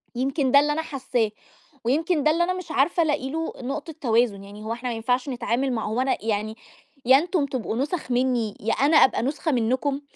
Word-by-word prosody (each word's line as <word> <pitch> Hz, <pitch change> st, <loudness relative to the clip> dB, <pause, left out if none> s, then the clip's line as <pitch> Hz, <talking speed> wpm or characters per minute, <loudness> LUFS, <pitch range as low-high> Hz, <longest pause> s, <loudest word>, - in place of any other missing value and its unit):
يمكن 270 Hz, +2 st, 0 dB
ده 280 Hz, -, +8 dB
اللي 295 Hz, +1 st, +2 dB
أنا 320 Hz, -, -1 dB
حاسّاه. 255 Hz, -7 st, -1 dB, 0.5 s
ويمكن 310 Hz, +5 st, +1 dB
ده 305 Hz, -, +4 dB
اللي 335 Hz, +2 st, +2 dB
أنا 365 Hz, +1 st, 0 dB
مش 365 Hz, -3 st, -7 dB
عارفة 325 Hz, +6 st, +2 dB
ألاقي 290 Hz, -4 st, -1 dB
له 320 Hz, +3 st, -3 dB
نقطة 280 Hz, +5 st, -5 dB
توازن. 230 Hz, -5 st, +1 dB
يعني 205 Hz, +2 st, -11 dB
هو 220 Hz, +1 st, -3 dB
إحنا 245 Hz, +2 st, -4 dB
ما 235 Hz, -, -3 dB
ينفعش 250 Hz, +4 st, -1 dB
نتعامل 255 Hz, +1 st, -1 dB
مع 225 Hz, -2 st, -2 dB
هو 225 Hz, +4 st, -1 dB
أنا 265 Hz, 0 st, +1 dB
يعني 215 Hz, 0 st, -1 dB, 0.5 s
يا 260 Hz, +2 st, +7 dB
أنتم 335 Hz, 0 st, 0 dB
تبقوا 260 Hz, -5 st, -3 dB
نُسَخ 290 Hz, +1 st, -2 dB
منّي 245 Hz, -4 st, 0 dB
يا 225 Hz, -, -1 dB
أنا 295 Hz, +3 st, +3 dB
أبقى 265 Hz, -, +5 dB
نُسخة 295 Hz, +4 st, -1 dB
منّكم. 260 Hz, +3 st, 0 dB
265 Hz, 205 wpm, -24 LUFS, 235-300 Hz, 0.5 s, ده